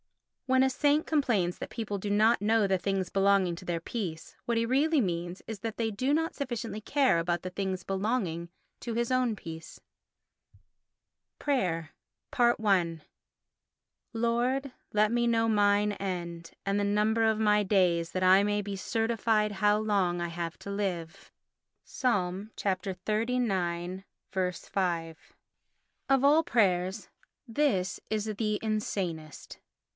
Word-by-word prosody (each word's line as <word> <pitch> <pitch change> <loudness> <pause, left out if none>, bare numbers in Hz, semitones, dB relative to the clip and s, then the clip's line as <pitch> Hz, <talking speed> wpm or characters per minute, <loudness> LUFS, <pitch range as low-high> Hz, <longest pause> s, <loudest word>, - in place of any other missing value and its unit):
When 260 0 +4
a 265 - +3
saint 290 +3 +2
complains 230 - +1
that - - -5
people 215 -4 -4
do 200 +1 -4
not 215 +3 +3
know 215 0 +3
the 190 -1 +1
things 190 0 -1
belonging 195 -2 +3
to - - -10
their 175 -2 -1
peace, 170 -3 -5
what 235 -1 0
he 230 - +2
really 290 +6 +2
means 175 -3 -2
is 220 -3 -5
that 225 +1 -5
they 225 -1 0
do 255 +7 -1
not 325 +3 0
sufficiently 235 -5 -4
care 260 - +2
about 170 0 -1
the 185 - -5
things 190 -1 -3
belonging 190 -4 -2 0.3
to 235 -2 -4
his 235 +1 0
own 250 -4 +1
peace. 160 -2 -9 1.6
Prayer 175 - -1 0.5
i 215 -8 +3 1.2
Lord, 245 +4 0 0.2
let 210 0 +3
me 240 0 +2
know 225 -1 +2
mine 205 -1 +3
end, 170 -4 -5
and 200 +1 +1
the - - +1
number 210 +2 +2
of 220 -1 +2
my 210 -1 +3
days: 180 -4 +2
that 185 - -2
I 190 +2 +6
may 205 0 +1
be 200 0 -5
certified 225 0 0
how 205 +1 +3
long 200 -5 +1
I 175 - -1
have 170 0 -5
to 200 - -7
live 180 -5 -4 0.5
(Ps. - - -11
xxxix. 190 -2 -2
5). 170 -4 -1 0.9
Of 270 -1 +4
all 305 +3 +5
prayers 190 - +1 0.4
this 225 -7 0
is 215 -1 -1
the 215 0 -1
insanest. 185 -8 -3
205 Hz, 140 wpm, -29 LUFS, 180-230 Hz, 1.6 s, I